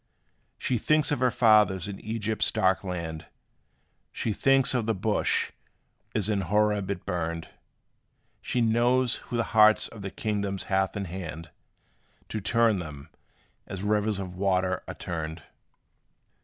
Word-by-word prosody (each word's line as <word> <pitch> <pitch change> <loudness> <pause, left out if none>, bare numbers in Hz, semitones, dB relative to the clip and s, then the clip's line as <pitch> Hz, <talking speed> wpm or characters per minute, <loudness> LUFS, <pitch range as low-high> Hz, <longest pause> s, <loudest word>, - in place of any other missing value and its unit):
She 125 - -1
thinks 155 +5 +2
of 145 - 0
her 125 0 +3
fathers 105 -5 +4
in 100 -1 -6
Egypt's 110 0 -1
dark 95 +1 +2
land 85 -4 -5 0.8
She 110 - -2
thinks 135 +3 +3
of 120 -3 0
the 115 - +1
bush, 105 +3 0 0.6
as 105 -3 +2
in 105 -2 +1
Horeb 105 +1 +1
it 100 - -4
burned; 85 -3 -3 0.9
She 125 - -1
knows 120 +2 +2
who 120 - -5
the 115 - +2
hearts 110 0 +6
of 110 - -11
the 100 - -4
kings 100 -2 -2
hath 95 0 0
in 100 - -3
hand, 85 -3 -7 0.8
To 110 - -3
turn 115 0 +3
them, 75 -3 -8 0.6
as 95 0 -6
rivers 105 0 +1
of 95 -2 -5
water 95 -1 0
are - - -6
turned. 80 -2 -5
100 Hz, 140 wpm, -27 LUFS, 90-110 Hz, 0.9 s, hearts